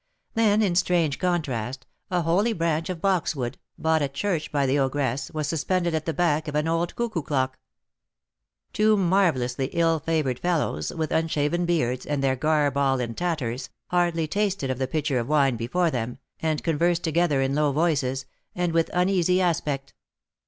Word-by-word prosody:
Then, 220 -1 +3
in 190 -4 +1
strange 170 -5 +1
contrast, 135 - -2 0.2
a 180 -2 0
holy 195 +8 +2
branch 165 -2 -1
of 175 -3 -4
boxwood, 150 -10 0 0.2
bought 160 -1 +2
at 135 -1 -2
church 175 -1 -1
by 140 -2 +1
the 135 +2 +2
ogress, 135 -1 -1
was 155 -2 -3
suspended 170 +2 0
at 160 0 -2
the - - +2
back 160 -3 +1
of 150 - -4
an 150 +1 +1
old 165 +1 -1
cuckoo 230 -8 -2
clock. 130 -3 -1 1.1
Two 215 0 +4
marvellously 165 -10 +1
ill 165 -1 +2
favoured 150 -5 -1
fellows, 160 - -1
with 160 -2 -3
unshaven 160 +1 0
beards, 125 -8 0
and 145 -2 -1
their 135 -1 +2
garb 145 0 +1
all 135 -2 +2
in 120 -2 -3
tatters, 135 -7 -2 0.2
hardly 175 -2 +2
tasted 195 -7 -1
of 130 - -4
the 130 - 0
pitcher 145 -2 0
of 120 - -4
wine 140 -4 +3
before 155 +10 0
them, 120 -1 -3 0.2
and 155 -2 -1
conversed 170 +1 +1
together 165 -3 +2
in 135 0 +1
low 150 0 +2
voices, 140 -4 0 0.3
and 175 -2 0
with 165 -1 +2
uneasy 180 0 +2
aspect. 150 -6 -1
155 Hz, 170 wpm, -25 LUFS, 135-175 Hz, 1.1 s, Two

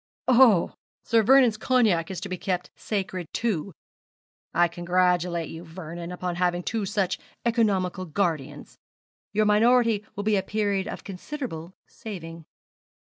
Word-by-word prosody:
'Oh! 240 -8 +5 0.3
Sir 230 -1 +3
Vernon's 245 -1 +5
cognac 220 -9 +2
is 190 - -4
to 205 - -4
be 185 - -3
kept 180 -2 -2
sacred, 185 -5 -4
too. 200 -6 -1 0.8
I 175 +1 +4
congratulate 175 -1 0
you, 165 +1 -8
Vernon, 170 0 -8
upon 180 -1 -4
having 175 0 0
two 220 -1 -2
such 195 -2 -1 0.3
economical 195 -6 +1
guardians. 155 -5 -3 0.5
Your 215 +1 +2
minority 225 0 +4
will 205 - -3
be 210 -1 +2
a - - +2
period 200 -1 -1
of - - -6
considerable 190 - -6
saving.' 165 -6 -9
190 Hz, 130 wpm, -26 LUFS, 175-215 Hz, 0.8 s, Oh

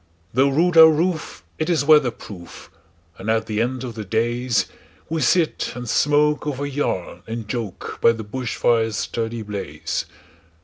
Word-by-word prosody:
Though 135 +3 +4
rude 165 +5 +2
our 160 0 +11
roof, 160 +1 -1 0.2
it 155 +2 -1
is 160 -5 +1
weather 150 -4 +6
proof, 95 -6 -11 0.5
And 100 +3 -5
at 110 0 +1
the 110 0 -1
end 125 +2 -2
of 120 -2 -5
the 110 -1 -6
daysWe 120 - -2
sit 170 -1 +1
and 125 -1 -6
smoke 150 +3 +2
over 145 -1 -2
yarn 135 -11 -3
and 115 -1 -5
joke, 110 -4 -5
By 115 - +6
the 110 -1 -6
bush 120 +3 -4
fire's 115 -2 +1
sturdy 115 0 -3
blaze. 100 -8 -4
120 Hz, 160 wpm, -22 LUFS, 110-150 Hz, 0.5 s, our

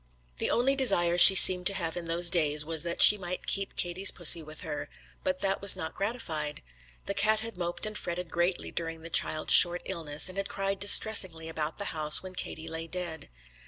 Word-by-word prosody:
The - - -4
only 265 +3 -2
desire 185 -10 0
she 195 - +11
seemed 180 -1 +7
to 200 - -1
have 165 -4 -6
in 175 -1 -8
those 170 +1 0
days 150 -3 0
was 160 -1 -5
that 170 0 0
she 210 - +8
might 180 0 -9
keep 195 0 -2
Katie's 180 +3 +1
pussy 170 -1 +3
with 155 0 -11
her, - - -9 0.3
but 280 0 -5
that 195 0 -3
was 200 -1 +3
not 160 - -8
gratified. 165 - -6 0.4
The 200 - -6
cat 215 +2 -1
had 230 -1 -10
moped 175 +1 -5
and 215 0 -9
fretted 175 -2 -8
greatly 175 +1 -4
during 165 -1 -8
the 165 - -13
child's 155 0 0
short 175 0 +5
illness, 150 -1 -3
and 185 +1 -8
had 195 - -7
cried 195 0 -5
distressingly 190 -5 +2
about 160 -1 -7
the 200 - -5
house 155 0 +1
when 185 -1 -12
Katie 160 -3 -8
lay 165 0 -8
dead. 170 - -9
175 Hz, 205 wpm, -25 LUFS, 165-195 Hz, 0.4 s, she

